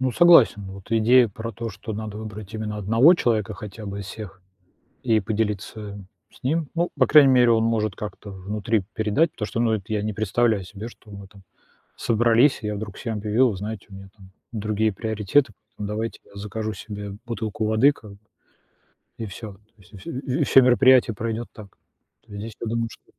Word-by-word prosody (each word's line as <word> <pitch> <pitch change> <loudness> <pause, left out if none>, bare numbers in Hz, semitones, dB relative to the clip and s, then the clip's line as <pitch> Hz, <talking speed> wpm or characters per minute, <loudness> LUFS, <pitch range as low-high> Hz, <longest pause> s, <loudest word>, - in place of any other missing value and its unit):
Ну, 130 -1 +1
согласен. 160 -11 +6
Вот 95 +2 -12
идея 115 +2 +5
про 110 +3 -7
то, 115 +2 -5
что 105 +3 -7
надо 105 0 -6
выбрать 105 -1 -8
именно 110 -1 -4
1 115 - +5
человека 110 - 0
хотя 105 +1 -9
бы 100 0 -5
из 100 - -8
всех- 100 -3 -9 0.6
и 110 -3 +2
поделиться 105 -1 -4 0.3
с 115 - -21
ним. 155 +3 0
Ну, 170 +1 0
по - - +5
крайней 140 -4 +7
мере, 125 -1 +5
он 110 0 +3
может 110 -3 0
как-то 105 -1 -7
внутри 100 +2 -2
передать. 110 +10 +1
Потому 105 - -4
что, 115 - -3
ну 115 -2 +2
это, 110 0 -3
я 105 -1 0
не 110 0 -2
представляю 110 0 +1
себе, 105 +4 -8
что 110 -2 -17
мы 100 -1 -10
там 100 -1 -18 0.5
собрались, 120 +4 +3
и - - -4
я 105 - -2
вдруг 100 -1 -7
всем 115 -2 -4
объявил: 110 +5 +2
"Вы 100 - -5
знаете, 105 +1 -6
у - - -11
меня 95 0 -11
там 95 -2 -16 0.2
другие 110 0 0
приоритеты, 110 +4 0 0.2
поэтому 105 - -5
давайте 110 +2 -4
я - - -22
закажу 105 +2 -4
себе 100 0 -7
бутылку 110 -2 -3
воды", 110 +7 +4
как 105 -7 -14
бы 100 - -15 1.0
и 115 - -4
всё. 105 +1 -8
То - - -21 0.2
есть 95 +2 -21
вс 95 - -15 0.2
вс 130 -1 0
всё 135 - +8
мероприятие 125 -2 +5
пройдёт 115 +2 -4
так. 105 -2 -11 0.6
То - - -16
есть 100 - -6
здесь, 110 +1 -6
я 115 - -4
думаю, 115 +1 -1
что - - -15
110 Hz, 200 wpm, -23 LUFS, 100-115 Hz, 1.0 s, всё